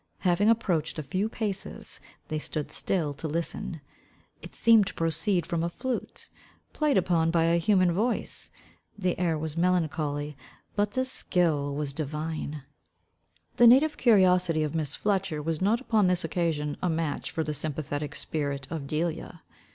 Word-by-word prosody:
Having 190 +3 +3
approached 180 -10 +1
a 155 - -3
few 185 +10 -1
paces, 205 -4 -4 0.3
they 155 - -2
stood 150 -1 -4
still 160 -7 -1
to 150 +3 -5
listen. 160 0 -3 0.6
It - - -11
seemed 225 -4 +5
to 190 - -6
proceed 165 +2 0
from 170 0 -1
a 170 - 0
flute, 255 +8 -4 0.5
played 300 -3 +2
upon 170 -3 +2
by 165 0 +3
a 170 +1 +3
human 185 0 +3
voice. 220 +8 -2 0.5
The 185 -3 0
air 170 -3 +1
was 155 0 -4
melancholy, 155 -4 0 0.4
but 205 0 +1
the 260 0 +1
skill 160 - 0
was 145 -1 -3
divine. 155 0 -4 0.9
The 240 - +8
native 280 +6 +6
curiosity 180 -7 +4
of 150 0 -2
Miss 155 -3 -2
Fletcher 190 -6 0
was 160 +2 -2
not 215 +5 +3
upon 220 -6 +2
this 180 -1 +2
occasion 150 -4 -1
a 180 - +1
match 160 -3 -2
for 160 - -2
the 150 0 -3
sympathetic 150 -1 -4
spirit 140 -3 -3
of 155 -4 -4
Delia. 165 +2 -3
165 Hz, 155 wpm, -28 LUFS, 155-190 Hz, 0.9 s, The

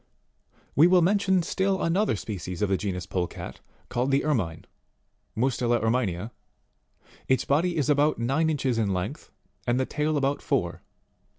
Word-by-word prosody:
We 155 +5 +7
will 180 -1 +5
mention 190 -1 +3
still 190 +2 0
another 175 - +2
species 95 -2 -5
of 105 - +1
the 95 - +3
genus 90 -3 -3
Polecat, 90 -1 -4 0.3
called 125 +2 -1
the 140 +1 +2
Ermine, 95 - -1 0.7
Mustela 120 -1 +1
Erminea. 110 -3 -1 1.0
Its 130 - +2
body 170 +5 +1
is 145 - +1
about 150 +1 +3
nine 135 +7 +1
inches 130 -6 0
in 105 -3 +1
length, 100 +11 -4 0.4
and 120 +1 +2
the 130 - +1
tail 150 +1 -1
about 140 0 0
four. - - -1
130 Hz, 150 wpm, -26 LUFS, 110-155 Hz, 1.0 s, We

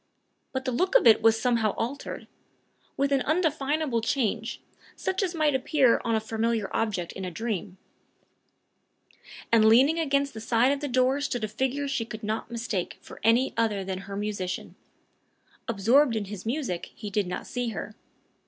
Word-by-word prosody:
But 260 0 -3
the 255 - 0
look 370 - 0
of - - +6
it 225 - +7
was 225 0 +4
somehow 230 -3 +1
altered 260 +5 -4 0.7
with 280 +1 +1
an 275 -1 +3
undefinable 305 -5 0
change, 225 -1 -1 0.4
such 380 +1 -2
as 370 -3 -1
might 305 -2 +2
appear 265 -1 +3
on 230 -1 +1
a - - +2
familiar 220 -1 -1
object 195 -6 -1
in 190 - -7
a 185 - -3
dream; 205 -1 -4 1.7
and 230 -1 +6
leaning 265 +9 +5
against 280 -3 +1
the 220 - -7
side 235 +3 +3
of 285 - 0
the 290 - -3
door 255 +2 +2
stood 245 -5 -2
a - - 0
figure 265 +6 -2
she 275 -4 -1
could 220 -1 -8
not 215 +2 -3
mistake 230 -6 -3
for - - -13
another 225 -3 +2
than 190 0 -4
her 195 +1 -8
musician. 205 -3 -4 0.9
Absorbed 230 +5 +3
in 215 -2 -1
his 205 +1 -8
music, 235 - -2
he 210 -2 -7
did 200 -2 0
not 180 - -4
see 245 -2 -3
her. 215 0 -6
230 Hz, 170 wpm, -27 LUFS, 215-275 Hz, 1.7 s, it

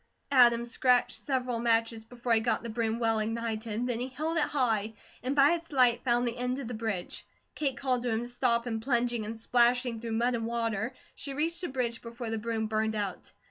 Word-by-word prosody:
Adam 240 -3 +6
scratched 245 +1 +2
several 255 -3 -2
matches 230 -1 +1
before 240 0 -2
he 225 - +5
got 230 +1 0
the 235 - -5
broom 225 0 -1
well 225 -2 +1
ignited, 225 0 -2
then 245 -2 -1
he 250 - -2
held 310 +5 -3
it 325 - +3
high, 225 -7 0 0.3
and 260 +3 -2
by 285 +2 +6
its 335 -1 -3
light 250 -4 +4
found 245 -1 +2
the 235 +1 -3
end 250 +1 -1
of 275 -4 -5
the 245 - -5
bridge. 215 -5 -3 0.3
Kate 280 -4 -1
called 255 -3 0
to 245 - -2
him 225 +1 0
to - - -6
stop 240 -1 +1
and 225 -2 -3
plunging 240 -2 0
and 225 +1 -6
splashing 240 0 +2
through 230 -1 -4
mud 240 +2 +1
and 230 -1 -2
water, 230 -1 -1 0.2
she 275 -1 -5
reached 330 +4 -1
the 355 - -2
bridge 245 -3 -2
before 235 -1 -6
the 225 - -1
broom 225 0 -2
burned 220 0 0
out. 200 -3 -4
235 Hz, 220 wpm, -29 LUFS, 225-250 Hz, 0.3 s, Adam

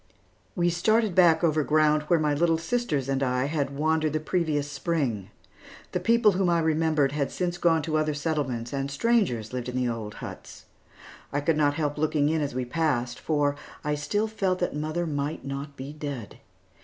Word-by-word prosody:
We 175 -1 +2
started 215 +4 +2
back 170 -2 +5
over 155 -2 +3
ground 155 0 +3
where 170 - +4
my 150 -2 +1
little 165 +2 +2
sisters 165 - -1
and 135 0 0
I 125 -1 +1
had 145 -2 -1
wandered 155 0 +1
the 155 - +1
previous 155 -3 -1
Spring. 140 - -2 0.6
The 180 - -1
people 225 +3 +4
whom 185 -1 +1
I 170 - +3
remembered 160 -3 +2
had 145 -1 -1
since 175 -1 -3
gone 165 -2 +3
to 155 0 0
other 155 -1 0
settlements, 140 -6 -2
and 135 0 -2
strangers 140 - +1
lived 125 -1 -3
in 125 - -6
the 125 -1 +1
old 110 -3 -4
huts. - - -9 0.7
I 145 - 0
could 155 +2 +1
not 145 -1 +2
help 150 -2 -2
looking 150 -1 +2
in 160 0 +1
as 140 -4 -3
we 130 -1 -1
passed, 125 -4 -1
for 145 -2 +1 0.3
I 150 - 0
still 175 +10 -1
felt 195 -4 0
that 180 -4 -2
mother 155 +3 -2
might 145 -1 -3
not 140 +1 -5
be 135 +3 -7
dead. 145 -8 -6
150 Hz, 190 wpm, -26 LUFS, 140-165 Hz, 0.7 s, back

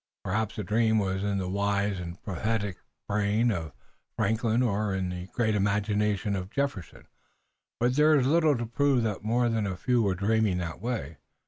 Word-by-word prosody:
Perhaps 110 +2 -1
the 105 - -3
dream 110 +1 +2
was 95 -2 0
in 100 -1 0
the 95 -1 -2
wise 100 0 0
and 85 0 -7
prophetic 100 0 -2 0.3
brain 105 +3 +1
of 80 -6 -3 0.5
Franklin 110 +3 +1
or 105 -3 0
in 95 -1 -1
the 90 0 -5
great 110 0 0
imagination 105 0 0
of 95 -1 -4
Jefferson, 135 - -3 0.7
but 120 +2 +2
there 155 +1 +5
is 135 -4 +3
little 155 -1 +3
to 120 - -3
prove 135 +1 +2
that 105 -3 -2
more 120 +3 +2
than 110 -3 0
a 95 -2 -4
few 125 +3 +1
were 100 -4 +1
dreaming 105 0 +1
that 85 -1 -5
way. 110 - -3
105 Hz, 180 wpm, -28 LUFS, 95-115 Hz, 0.7 s, there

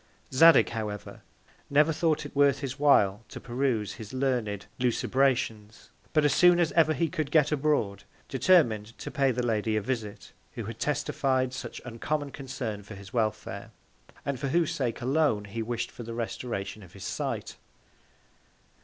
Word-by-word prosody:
Zadig, 165 +5 +7
however, 105 -3 -5 0.5
never 150 +3 +4
thought 155 -1 0
it 145 - -9
worth 140 -1 +4
his 135 0 -5
while 110 -8 +4
to - - -8
peruse 120 -5 -1
his 105 +1 -10
learned 120 -7 -1
Lucubrations; 120 -3 0 0.2
but, 155 -2 +3
as 145 - +4
soon 175 0 +6
as 170 -2 +2
ever 155 -2 +3
he 165 - +1
could 155 -1 -3
get 150 -1 +3
abroad, 140 -9 0 0.2
determin'd 120 - +2
to - - -7
pay 140 -3 +2
the 125 -1 -1
Lady 110 -1 0
a - - 0
Visit, 115 -5 -4 0.2
who 115 - -5
had 115 +1 -7
testified 135 -3 0
such 130 - -6
uncommon 140 +5 -3
Concern 130 -7 -5
for 105 +1 -10
his 95 -1 -12
Welfare, 110 -3 -2 0.6
and 140 -3 -2
for 140 - -2
whose 165 +3 +1
Sake 125 -4 -2
alone 130 -5 +1
he 115 +3 -5
wish'd 120 +1 -3
for - - -10
the 115 0 -6
Restoration 110 -3 -4
of 90 -3 -15
his 95 - -10
Sight. - - -4
125 Hz, 160 wpm, -28 LUFS, 110-145 Hz, 0.6 s, Zadig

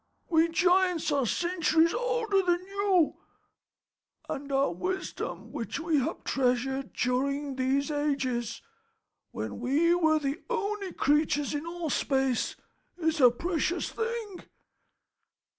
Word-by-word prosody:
"We 325 -1 +4
giants 360 -1 +2
are 275 -4 +1
centuries 335 - +2
older 475 -5 +1
than 355 -1 0
you, 395 -4 +1 1.1
and 280 +1 -5
our 270 -7 +2
wisdom 370 - -4
which - - -4
we 325 -3 +1
have 260 - -3
treasured 265 +1 0
during 275 +3 -1
these 270 +3 0
ages, 270 -6 -1 0.7
when - - -5
we 290 +8 +3
were 320 -3 +3
the 290 +2 -2
only 420 -4 -2
creatures 295 0 +1
in 295 +3 -3
all 335 -3 -3
space, 265 -3 0 0.4
is 320 -3 0
a 250 - +9
precious 340 +6 -1
thing. 450 -4 -4
315 Hz, 115 wpm, -28 LUFS, 275-360 Hz, 1.1 s, a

